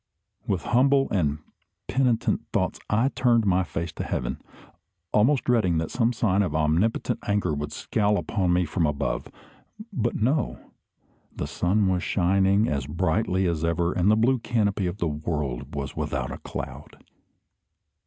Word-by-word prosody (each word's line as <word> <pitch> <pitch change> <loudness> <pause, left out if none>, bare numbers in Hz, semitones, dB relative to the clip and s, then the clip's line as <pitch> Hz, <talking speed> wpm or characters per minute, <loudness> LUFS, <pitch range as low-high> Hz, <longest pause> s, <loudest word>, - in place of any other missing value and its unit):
With 95 -5 -1
humble 135 +3 +3
and 75 -7 +1 0.5
penitent 125 -4 +1
thoughts - - 0
I 115 +6 +2
turned 120 -5 +2
my 95 -1 +3
face 85 -1 -4
to - - -5
heaven, - - -3 0.7
almost 125 +6 +3
dreading 110 -9 +2
that 80 0 -2
some 120 -1 +2
sign 105 -5 +1
of 90 -7 -1
omnipotent 85 +10 +1
anger 100 -6 +1
would 75 0 -4
scowl 105 -1 0
upon 95 -4 0
me 90 0 +2
from 80 +1 0
above. 70 -2 -2 0.7
But 120 - -1
no! 130 +5 0 0.8
The - - -3
sun 95 +3 +1
was 90 -1 +1
shining 95 +4 +2
as 70 -4 -2
brightly 95 +4 0
as 85 -3 -1
ever, 85 +1 +1
and 90 +3 +2
the 110 - +5
blue 125 +3 +3
canopy 105 -5 0
of 90 +3 -4
the 85 - -1
world 75 -4 -3
was 70 -1 -4
without - - -2
a - - -6
cloud. - - -7
95 Hz, 155 wpm, -25 LUFS, 85-115 Hz, 0.8 s, the